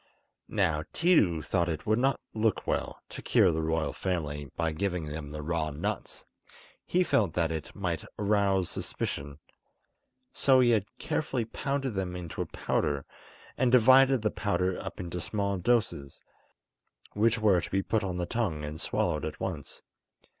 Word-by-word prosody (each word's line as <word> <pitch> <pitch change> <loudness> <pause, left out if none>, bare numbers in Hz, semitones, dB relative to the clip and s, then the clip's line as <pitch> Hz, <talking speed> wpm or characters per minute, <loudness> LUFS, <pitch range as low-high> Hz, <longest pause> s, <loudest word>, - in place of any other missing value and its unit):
Now 75 -2 +1
Tiidu 100 - +3
thought 85 -2 +1
it 80 -2 -4
would 110 +2 +2
not 135 +1 +2
look 110 -1 0
well - - -2
to - - -8
cure 90 - +4
the 80 0 -1
royal 80 -1 0
family 75 -6 -3
by 80 -1 0
giving 90 0 -2
them 75 0 -6
the 75 0 -6
raw 80 0 -1
nuts; 75 0 -4 0.6
he 180 +1 +3
felt 105 - +2
that 85 -2 +1
it 80 -2 -5
might - - -2
arouse 100 -3 +2
suspicion. 70 0 -4 1.0
So 130 -2 +4
he 120 -1 +5
had 105 -3 +2
carefully 130 -6 -1
pounded 135 +2 -2
them 95 -2 -3
into 85 -3 -5
a - - -3
powder, 70 -1 -1 0.5
and 125 -1 +3
divided 130 0 +6
the 110 - +1
powder 95 -3 -1
up - - -7
into 90 0 -4
small 100 -1 -1
doses, 90 - 0 0.9
which 110 +2 +3
were 105 -5 +4
to - - -7
be 95 0 0
put 110 +1 0
on 90 -2 -3
the 90 - -1
tongue 95 -9 -2
and 75 +2 -6
swallowed - - 0
at - - -5
once. - - -5
95 Hz, 160 wpm, -29 LUFS, 80-110 Hz, 1.0 s, divided